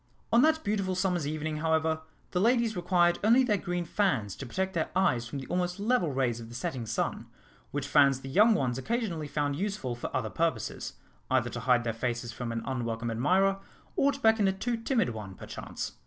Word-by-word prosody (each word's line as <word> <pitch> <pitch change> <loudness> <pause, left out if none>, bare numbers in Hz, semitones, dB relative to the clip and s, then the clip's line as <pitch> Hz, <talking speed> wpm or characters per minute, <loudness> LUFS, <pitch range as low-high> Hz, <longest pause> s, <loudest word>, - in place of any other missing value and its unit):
On 235 - +7
that 315 +2 +3
beautiful 200 -3 0
summer's 180 -5 0
evening, 155 0 -3
however, 160 0 +1 0.3
the 180 - 0
ladies 235 0 +3
required 175 -1 +2
only 235 +5 +6
their 220 -5 +2
green 175 -2 -2
fans 165 - 0
to 135 - -6
protect 190 +9 -2
their 165 -3 -1
eyes 130 -11 +2
from 125 - -5
the 135 - -6
almost 180 +3 -1
level 210 - +1
rays 130 -3 0
of 115 -1 -9
the 120 - -10
setting 120 -1 -3
sun, 115 - -2 0.4
which 145 -1 -3
fans 140 -2 +4
the 135 - -8
young 215 - +5
ones 130 -7 0
occasionally 190 - -2
found 145 -1 -1
useful 195 -7 -2
for 120 - -5
other 110 -4 -3
purposes 160 -9 -2 0.4
either 125 -2 +1
to 120 - -4
hide 125 0 +3
their 115 -1 -1
faces 120 +1 -3
from 120 -1 -5
an 115 0 -3
unwelcome 115 -3 -2
admirer, 190 +12 +2 0.4
or 280 - +3
to 275 - -7
beckon 220 -4 +4
a 190 - +2
too 235 +5 -2
timid 230 - +1
one, 105 -4 -7
perchance. - - -6
160 Hz, 200 wpm, -29 LUFS, 125-195 Hz, 0.4 s, On